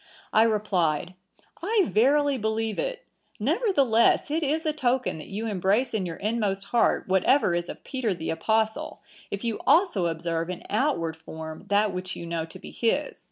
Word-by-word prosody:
I 215 - +6
replied, 185 -7 +1 0.5
'I 405 +2 +2
verily 280 +5 +3
believe 220 0 -1
it; - - -3 0.3
nevertheless 280 - +3
it 320 +2 +1
is 315 +2 0
a 310 - +1
token 255 - 0
that - - -9
you 210 +3 -4
embrace 210 +4 +1
in 195 -5 -1
your 165 - -5
inmost 205 -1 -1
heart 235 - +2
whatever 190 +3 +3
is 175 0 -2
of - - -8
Peter 255 -5 -2
the 165 -3 -3
Apostle, 220 +6 -1 0.3
if 200 +2 -5
you 230 -2 -2
also 325 - +4
observe 165 0 -2
in 180 -1 -5
outward 210 - 0
form 160 -1 -9
that 205 0 +2
which 185 0 -4
you 170 - -7
know 165 -1 -2
to 165 - -10
be - - -11
his. 260 +6 -1
215 Hz, 170 wpm, -26 LUFS, 175-265 Hz, 0.5 s, I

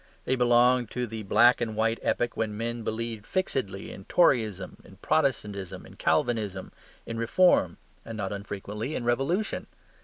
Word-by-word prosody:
They 130 - +1
belonged 125 -1 +4
to 125 0 -2
the 110 -1 -6
black 120 +5 +4
and 110 -2 -2
white 115 +1 +1
epoch 120 0 0
when 105 -2 -2
men 115 +1 -3
believed 110 -1 -3
fixedly 130 - -2
in 95 - -10
Toryism, 110 - +2
in 95 - -15
Protestantism, 105 - -1
in - - -14
Calvinism, 105 -6 0 0.3
in 115 0 -5
Reform, 115 - +3 0.3
and 115 -1 -7
not 100 -1 -3
unfrequently 105 +5 -5
in - - -3
Revolution. 135 - 0
115 Hz, 150 wpm, -27 LUFS, 105-125 Hz, 0.3 s, belonged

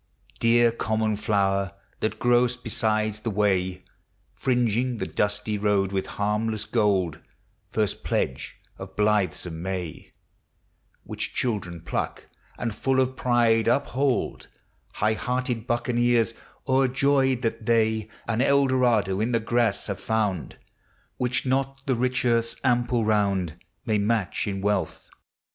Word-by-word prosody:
Dear 120 0 +4
common 110 -1 0
flower, 100 -2 0 0.3
that 110 - -1
grow'st 120 0 +2
beside 110 -2 0
the 110 +2 -4
way, 95 -3 0 0.5
Fringing 125 -1 0
the 95 - -2
dusty 105 +1 -1
road 100 -2 +1
with 95 -1 -2
harmless 105 +1 0
gold! 100 -7 +1 0.5
First 105 -3 -1
pledge 65 - -2 0.2
of 95 0 -9
blithesome 100 -5 0
May, 90 -3 -5 0.9
Which - - -4
children 100 -9 -2
pluck, 85 - -4 0.3
and, 115 -3 -2
full 135 +4 +1
of 130 0 +1
pride, 120 -3 +2
uphold 130 +1 0 0.2
— - - -39
High 110 +1 +3
hearted 125 0 -2
buccaneers, 120 -1 +2 0.3
o'er 135 0 +3
joyed 135 -1 +2
that 115 0 -2
they 110 -2 +2 0.2
An 115 +1 0
Eldorado 130 -8 +3
in 120 +3 0
the 115 - +3
grass 115 -2 0
have 100 -3 -4
found, 105 -7 -1 0.6
Which 125 +1 -1
not 135 +1 -1
the 135 - +1
rich 125 +1 0
earth's 115 -1 +2
ample 120 -2 +2
round 100 -6 +1 0.3
May 110 -3 +1
match 105 -5 0
in 95 -1 -3
wealth 105 +1 -2
110 Hz, 125 wpm, -25 LUFS, 105-125 Hz, 0.9 s, Dear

